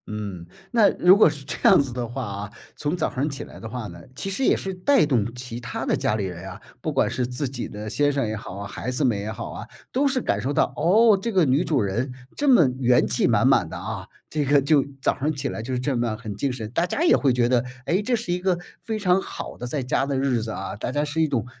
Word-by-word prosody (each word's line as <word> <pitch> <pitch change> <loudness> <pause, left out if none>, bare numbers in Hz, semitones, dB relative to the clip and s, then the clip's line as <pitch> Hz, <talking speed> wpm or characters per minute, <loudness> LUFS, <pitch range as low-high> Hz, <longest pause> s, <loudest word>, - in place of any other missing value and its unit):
嗯， 100 -5 -6 0.2
那 225 -4 +5
如 180 +2 +7
果 205 - +6
是 145 -2 -8
这 - - -4
样 - - +7
子 135 -3 -1
的 120 -1 -3
话 130 +3 -5
啊， 100 0 -6 0.2
从 150 +4 -2
早 160 - -1
晨 140 +3 0
起 135 - -6
来 - - -12
的 115 - -7
话 120 -1 -5
呢， 85 -2 -10
其 195 - -4
实 230 +8 -2
也 - - +4
是 190 - -4
带 185 - +3
动 120 -6 +1
其 125 -1 -6
他 120 - -5
的 - - +2
家 105 - 0
里 105 -3 -1
人 90 0 -6
啊， - - -9 0.2
不 155 - -2
管 140 - +2
是 125 - -1
自 125 +3 -3
己 125 -2 -5
的 105 +1 -7
先 145 +6 +2
生 135 -4 0
也 110 - -2
好， 100 -1 -7
孩 100 +4 -5
子 130 +3 0
们 120 -4 +2
也 105 +2 -4
好 - - -6
啊， - - -8 0.2
都 280 +3 +2
是 265 -1 +1
感 100 - -1
受 130 +5 -1
到， 145 - +1
哦， 205 +7 +5
这 230 - -2
个 185 -5 +4
女 140 +5 +3
主 155 -6 +1
人 110 +7 -1 0.2
这 290 - +1
么 205 - +7
元 125 -1 +4
气 - - +1
满 - - +3
满 - - +3
的 - - -6
啊， - - -5 0.2
这 150 -1 -1
个 145 +1 +4
就 140 0 +3 0.2
早 - - +1
上 150 +3 +1
起 140 -3 -3
来 - - -4
就 125 +3 -3
这 130 +2 -1
么 120 -2 -1
很 110 -2 -6
精 135 +6 -1
神， 120 -4 -5
大 170 +7 +1
家 290 - -1
也 345 - +6
会 140 - +2
觉 120 -1 +2
得， 125 -1 +2 0.2
哎， 185 +4 +1
这 245 +3 +1
是 215 -6 -2
一 180 - -1
个 180 -1 +1 0.2
非 220 -1 -3
常 190 -2 +2
好 - - -7
的 125 - -6
在 135 +2 -2
家 135 +1 0
的 140 -1 -1
日 130 -3 +1
子 110 - -5
啊， 95 -2 -5
大 110 - -4
家 145 +3 0
是 150 +2 -1
一 160 - +3
种 125 -6 -1
135 Hz, 295 characters per minute, -24 LUFS, 115-165 Hz, 0.2 s, 如